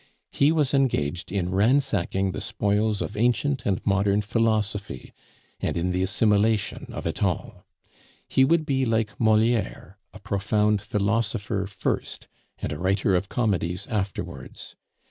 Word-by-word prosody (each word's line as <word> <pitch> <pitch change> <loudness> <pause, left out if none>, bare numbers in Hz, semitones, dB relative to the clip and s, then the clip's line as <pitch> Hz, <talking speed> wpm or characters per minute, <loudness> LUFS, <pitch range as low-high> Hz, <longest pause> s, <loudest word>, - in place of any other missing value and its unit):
He 140 +2 +3
was 150 -4 +1
engaged 90 - 0
in 95 -2 -1
ransacking 100 -3 +1
the - - -5
spoils 105 +1 0
of 105 - -6
ancient 125 +3 +1
and 95 -2 -1
modern 100 +1 +2
philosophy, 105 - -1 0.5
and - - -2
in 90 +2 0
the 90 0 0
assimilation 105 +2 +1
of - - -6
it - - -3
all; - - -2 0.6
he 130 - +3
would 160 +3 +3
be 135 -2 +1
like 110 -3 -1
Moliere, 110 -3 +1
a - - -11
profound 105 +1 0
philosopher 105 -1 -1
first, 95 -1 -3 0.3
and - - -4
a 75 - -5
writer 95 +1 +1
of 95 +2 -1
comedies 90 -7 -1
afterwards. 100 -3 -5
105 Hz, 135 wpm, -25 LUFS, 95-115 Hz, 0.6 s, He